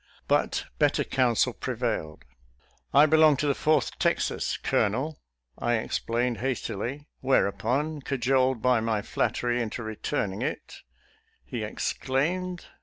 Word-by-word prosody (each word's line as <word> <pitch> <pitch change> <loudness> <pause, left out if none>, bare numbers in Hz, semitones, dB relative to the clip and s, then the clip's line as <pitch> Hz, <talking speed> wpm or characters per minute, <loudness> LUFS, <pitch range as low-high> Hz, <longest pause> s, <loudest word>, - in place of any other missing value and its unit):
But - - +1
better - - +3
counsel 125 -1 +2
pre 125 - -4
vailed. 110 -10 -3 0.4
" - - -35 0.3
I 145 +2 +7
belong 155 -1 +5
to 150 - -1
the 140 - +3
Fourth 150 -2 +1
Texas, - - 0
Colo - - +2
nel," 135 +9 -3 0.4
I 120 0 +1
explained 115 +1 -1
hastily; 130 +2 -3
whereupon, 135 +4 +1
cajoled 130 -2 +1
by 125 -2 +4
my 110 -2 -1
flattery 120 0 0
into 115 +1 -4
returning 105 -2 -3
it, 130 - -4 0.7
he - - -5
exclaimed, 175 +7 -1
B. - - -16
125 Hz, 130 wpm, -27 LUFS, 115-145 Hz, 0.7 s, I